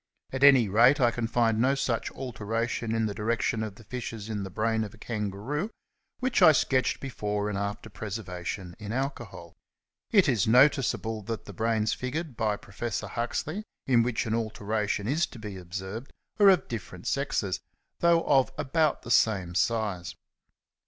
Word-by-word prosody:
At 135 +1 -1
any 135 -5 +7
rate 120 +9 +5
I 120 -3 +4
can 115 -1 -2
find 115 -1 +2
no 130 +4 +3
such 130 -4 -1
alteration 115 -2 -2
in 115 -1 +1
the 105 - -2
direction 110 +1 0
of 110 -3 -4
the 115 - -15
fissures 115 -2 -6
in 105 -2 -2
the 95 - -5
brain 110 +4 0
of 105 0 -7
a - - -19
Kangaroo 110 - -3 0.5
which 255 -1 0
I 160 - +9
sketched 130 -2 +1
before 105 -5 -2
and 105 - -3
after 100 +2 -3
preservation 95 -4 -6
in 105 -1 -6
alcohol. 135 +3 -4 0.6
It 200 -7 +5
is 115 -8 +2
noticeable 125 -3 +3
that 115 -1 -4
the 100 - -9
brains 110 +2 +1
figured 140 +2 -4
by 110 -2 0
Prof. 110 +4 -4
Huxley, 155 - -3 0.2
in 125 -3 +4
which 120 0 0
an 110 - -1
alteration 105 -2 -1
is 155 +7 +1
to - - -12
be 105 -3 -7
observed, 95 +6 -6 0.3
are 205 -1 +8
of 185 -3 +4
different 115 -4 -7
sexes, - - -1 0.4
though 170 -1 +4
of 135 -2 +3
about 155 +1 +1
the 120 - -5
same 95 -8 +3
size. 105 -4 -1
115 Hz, 165 wpm, -28 LUFS, 105-130 Hz, 0.6 s, I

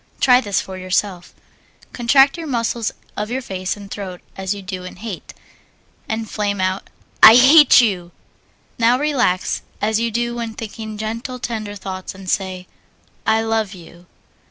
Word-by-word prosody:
Try 250 -1 +5
this 205 -5 0
for 190 -1 -7
yourself. 185 0 -2 0.6
Contract 270 +3 +4
the 330 -2 -6
muscles 235 -3 -1 0.2
of 210 +1 -3
your 260 +2 -3
face 185 -2 -4
and 200 -1 -11
throat 185 -3 -6
as 190 0 -4
you 200 - -9
do 185 -1 -6
in 185 - -9
hate, 205 -2 -7 0.8
and 220 0 -2
flame 205 -1 -2
out 185 +1 -1 0.3
"I 220 - +11
hate 270 +2 +8
you!" 180 -7 -1 0.7
Now 235 +2 +4
relax 255 -10 0 0.2
as 215 +1 +1
you 230 0 0
do 235 +1 -1
when 230 -2 -5
thinking 220 -1 -7
gentle, 230 +4 -4
tender 220 -4 -5
thoughts, 190 -1 -7
and 190 0 -12
say, 185 -1 -2 0.6
"I 220 0 +3
love 220 -3 -1
you." 175 0 -15
215 Hz, 155 wpm, -20 LUFS, 190-235 Hz, 0.8 s, I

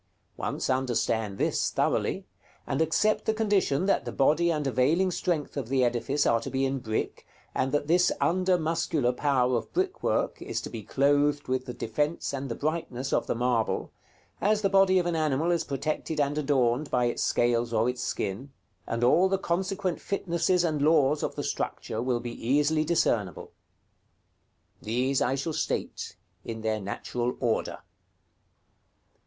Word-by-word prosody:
Once - - -3
understand 115 -5 0
this - - +1
thoroughly, - - 0 0.4
and - - -1
accept 185 +7 +2
the 220 - +1
condition 200 -8 +1
that 195 - +2
the - - -5
body 155 +5 +3
and 150 -3 -1
availing 145 +9 +2
strength 170 -4 -2
of 135 -5 -4
the 130 -1 +2
edifice 125 +4 0
are 115 - +3
to 115 - -6
be 135 0 0
in 135 0 -1
brick, 110 -3 -3 0.3
and 130 - 0
that 145 0 0
this 175 +4 +3
under 185 +1 +2
muscular 160 -5 0
power 130 -2 +1
of 115 - -3
brickwork 375 0 -1
is - - -3
to - - -7
be 115 - -6
clothed 145 +5 +1
with 130 0 -1
the 125 - -4
defence 145 +8 -2
and 135 0 -4
the 115 - -3
brightness 145 -4 -3
of - - +1
the - - 0
marble, 120 -1 0 0.5
as 210 +1 +2
the 195 - +2
body 195 -1 +5
of 180 - +2
an 175 -1 0
animal 155 +1 +1
is 170 -2 +1
protected 150 +2 -3
and 145 0 +1
adorned 140 -2 +1
by 125 -1 +2
its 120 - -1
scales 120 -1 +1
or 115 0 +2
its 125 0 -2
skin, 110 +7 -3 0.4
and 115 +1 -2
all 175 +10 +5
the 195 - +2
consequent 185 0 -2
fitnesses 180 -2 0
and 155 -4 0
laws 150 -1 +3
of - - -3
the - - -3
structure 110 - -3
will 125 -1 0
be 120 0 -6 0.2
easily 150 +3 +3
discernible: 110 - 0 1.3
These 125 +5 0
I 130 - +1
shall 145 +4 -3
state - - -3 0.3
in 115 -1 -6
their 110 -1 -1
natural 120 +5 -3
order. 120 -3 -1
140 Hz, 165 wpm, -27 LUFS, 125-165 Hz, 1.3 s, body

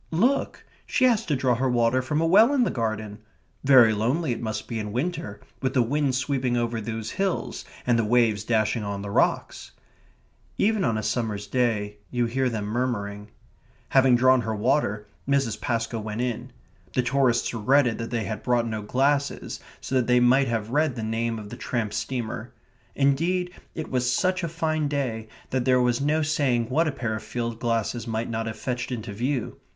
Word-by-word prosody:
"Look 240 +12 0 0.2
she 260 - +2
has 230 -3 +3
to 150 - +1
draw 130 -1 +2
her 130 +2 0
water 120 +1 +2
from 150 +4 -1
a - - +2
well 215 +11 +6
in 260 - +4
the - - 0
garden." 110 -2 -3 0.4
"Very 130 -5 +7
lonely 125 +8 0
it 120 - -3
must 110 -2 -4
be 115 -2 -3
in 105 -1 -4
winter, 165 - -3 0.2
with 130 0 -1
the 125 - +5
wind 140 +2 0
sweeping 130 -1 0
over 120 -1 -1
those 110 0 -4
hills, 195 -1 -2 0.2
and 120 -2 +3
the - - +2
waves 110 -2 +2
dashing 110 0 +1
on 100 -1 -4
the 100 - -5
rocks." - - 0 0.8
Even 215 -1 +2
on 115 -6 +1
a 110 - -3
summer's 105 -4 -2
day 105 -3 0
you 120 -1 0
hear 130 +2 0
them 110 -3 -3
murmuring. 105 -3 -2 0.6
Having 130 -2 +5
drawn 130 +1 +5
her 110 -1 -2
water, 105 -2 +1 0.2
Mrs. 135 -5 +1
Pascoe 115 0 -1
went 110 +2 -4
in. 125 -2 -3 0.4
The 125 - +2
tourists 125 -1 +1
regretted 120 +2 +2
that 115 - -4
they 115 -2 -1
had 110 -1 -4
brought 120 -2 +1
no 110 -2 -3
glasses, 140 +6 0 0.2
so - - -6
that 130 -2 +2
they 125 0 +5
might 130 +2 +4
have 115 -1 -2
read 150 -1 +1
the 115 - -4
name 115 +1 -1
of 105 -1 -8
the - - -7
tramp 115 -4 -2
steamer. 120 -2 -4 0.4
Indeed, 170 +6 +1 0.2
it 160 - -5
was 125 -1 +1
such 185 +7 +1
a - - 0
fine 155 -2 -1
day 125 -6 -2 0.2
that 130 -1 0
there 130 -1 +4
was 125 0 +2
no 155 +2 +2
saying 130 -6 +1
what 160 +5 +3
a - - +1
pair 115 -5 -3
of 110 - -5
field 115 -2 -4
glasses 115 0 -1
might 115 +1 -2
not 115 0 -2
have 110 -1 -5
fetched 125 +1 -3
into 110 -4 -4
view. 125 +3 -2
120 Hz, 195 wpm, -25 LUFS, 110-140 Hz, 0.8 s, Very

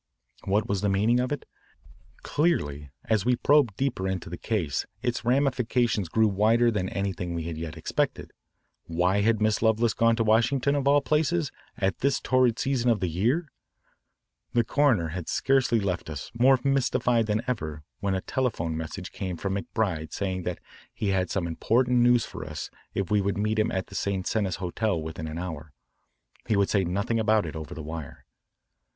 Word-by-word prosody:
What 100 +3 +1
was 100 -2 -1
the 105 - +1
meaning 105 +5 +3
of 125 +2 -1
it? 145 - -3 0.8
Clearly, 75 - 0 0.2
as 110 -4 +1
we 125 +2 +3
probed 135 -5 +3
deeper 130 -8 -1
into 95 -3 -4
the 85 - -5
case, 85 -11 -1 0.2
its 120 -1 -1
ramifications 125 - +1
grew 110 +4 +3
wider 110 +4 +3
than 95 -4 -1
anything 95 -3 -3
we 85 - -3
had 80 0 -4
yet 80 0 -6
expected. 80 - -2 0.5
Why 90 +4 +1
had 110 +1 +2
Miss 110 -1 +1
Lovelace 110 0 +3
gone 115 0 +3
to 115 - +1
Washington, 120 +5 +3
of 140 -1 0
all 145 +1 +5
places, 155 0 +1 0.3
at 95 0 0
this 140 +1 +1
torrid 125 -2 +2
season 130 -3 +1
of 115 -3 +3
the 90 - -1
year? 125 - 0 1.0
The 120 - +3
coroner 115 - +2
had 85 +1 -5
scarcely 135 -4 +2
left 90 -5 -2
us, 75 -3 -6
more 130 +3 +5
mystified 125 -4 +2
than 105 +2 0
ever, 80 -11 -3 0.2
when 100 -1 0
a 95 - -2
telephone 90 -12 -1
message 80 +4 -6
came 95 -3 -4
from 95 +3 -2
McBride 95 -5 -2
saying 95 -2 -2
that 90 0 -3 0.3
he 105 - -2
had 95 -1 +1
some 95 -3 -1
important 120 +9 +2
news 120 -1 +4
for - - -8
us 75 0 -6 0.2
if 95 -1 -2
we 105 -1 +4
would 100 0 -1
meet 105 +1 0
him 110 - +2
at 95 -1 -2
the - - -16
St. 100 -2 -2
Cenis 100 -6 0
Hotel 90 +1 -1
within 80 0 -5
an 80 +1 -5
hour. 80 -4 -6 0.7
He 110 - +2
would 100 -1 +2
say 100 -2 +3
nothing 100 +6 -1
about 110 -3 +3
it 80 - -6
over 80 -3 -6
the 80 - -6
wire. 80 -1 -7
105 Hz, 185 wpm, -27 LUFS, 90-120 Hz, 1.0 s, all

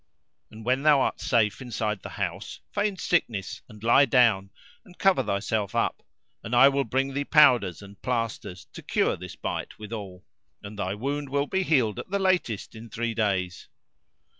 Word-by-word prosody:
And 110 0 -12
when 130 +2 +1
thou 150 -1 +5
art - - -1
safe 105 -6 +1
inside 110 -4 -3
the - - -8
house - - -4
feign 205 -1 -1
sickness 115 - -1
and 105 -1 -14
lie 120 +5 +6
down 115 -7 +3 0.3
and 180 - -18
cover 190 -8 +3
thyself 100 -2 -2
up; - - 0 0.4
and 115 +1 -2
I 135 +3 +8
will 140 0 0
bring 135 +3 -1
thee 140 +1 -1
powders 120 - +4
and 100 0 -14
plasters 115 -7 -3
to - - -9
cure - - +1
this - - -9
bite - - -5
withal, 105 -4 -8 0.4
and 105 +1 -9
thy 95 0 -2
wound 140 +5 -3
will 140 +1 0
be 190 +6 -1
healed 130 - +1
at - - -8
the 200 - 0
latest 185 - 0
in 115 +1 -11
three 115 +1 -3
days." 95 -5 -1
115 Hz, 175 wpm, -26 LUFS, 105-140 Hz, 0.4 s, I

